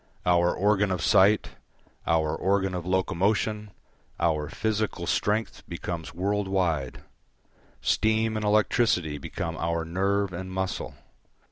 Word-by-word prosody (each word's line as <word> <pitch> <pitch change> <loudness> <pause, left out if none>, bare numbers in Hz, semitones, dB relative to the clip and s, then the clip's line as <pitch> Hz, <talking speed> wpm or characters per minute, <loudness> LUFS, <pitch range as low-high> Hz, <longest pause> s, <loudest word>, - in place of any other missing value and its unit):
Our 85 0 +4
organ 105 +1 +2
of 90 -3 -2
sight, 100 +3 +4 0.6
our 80 -2 +2
organ 95 0 +1
of 90 -1 -4
locomotion, 105 +3 0 0.5
our 80 -3 0
physical 110 -1 -2
strength 110 +2 0
becomes 85 -1 -5
world 100 +3 -1
wide; 85 -9 -1 0.8
steam 110 0 +1
and 110 - -2
electricity 105 -7 +2
become 80 +4 -4
our 85 0 -1
nerve 100 +3 0
and 95 +2 -6
muscle. 95 -7 -3
95 Hz, 115 wpm, -27 LUFS, 85-105 Hz, 0.8 s, Our